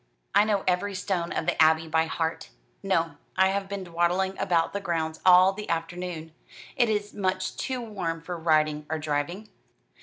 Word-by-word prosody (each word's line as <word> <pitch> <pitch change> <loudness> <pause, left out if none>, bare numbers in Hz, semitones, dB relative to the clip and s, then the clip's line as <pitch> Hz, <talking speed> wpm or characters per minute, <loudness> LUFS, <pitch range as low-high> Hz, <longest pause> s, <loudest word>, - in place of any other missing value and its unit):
"I 210 - +5
know 205 -3 +1
every 190 +2 0
stone 185 -2 -2
of - - -2
the - - +1
Abbey 160 0 +4
by 160 0 +2
heart. 160 0 -3 0.3
No, 165 -6 0 0.2
I 190 0 +5
have 195 0 -2
been 200 -1 -4
dawdling 175 +2 0
about 165 -2 +1
the 200 - -1
grounds 160 -4 -2
all 185 +1 +7
the 210 +1 -7
afternoon. 165 -1 -4 0.4
It 240 -3 +3
is 210 -1 -1
much 185 -2 -1
too 260 -2 -3
warm 185 -8 -4
for 175 +2 -6
riding 155 -2 +1
or 160 - -1
driving." 155 +7 -3
175 Hz, 175 wpm, -26 LUFS, 160-195 Hz, 0.4 s, all